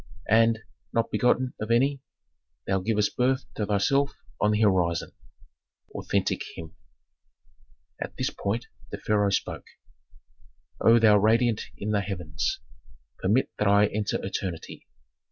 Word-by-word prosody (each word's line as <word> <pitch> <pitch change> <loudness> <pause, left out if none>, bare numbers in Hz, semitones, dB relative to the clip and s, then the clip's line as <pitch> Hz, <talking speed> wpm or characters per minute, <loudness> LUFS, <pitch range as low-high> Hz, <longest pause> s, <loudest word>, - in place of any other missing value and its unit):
_ - - -22 0.2
"And, 115 +1 +4 0.3
not 115 0 0
begotten 125 +1 +2
of 110 - -4
any, 135 +4 +2 0.6
thou 95 0 +1
givest 105 +1 0
birth 130 +2 +1
to 105 - -3
thyself 140 +8 +2 0.3
on 105 - +3
the 105 +1 +1
horizon." 90 -5 +2 0.8
Authentic - - -1
hymn. 80 -1 -9 1.3
At - - -6
this - - -1
point 110 +4 -3 0.2
the - - -5
pharaoh 105 -1 +1
spoke: 100 - -2 1.2
"O 115 +1 +7
thou 110 -2 +6
radiant 115 +2 +2
in 105 +1 -3
the 105 -1 +2
heavens! 90 -5 -3 0.6
Permit 105 +8 +1
that 105 - +2
I 100 +1 +5
enter 105 0 -1
eternity. 95 -3 -5
105 Hz, 130 wpm, -26 LUFS, 100-115 Hz, 1.3 s, O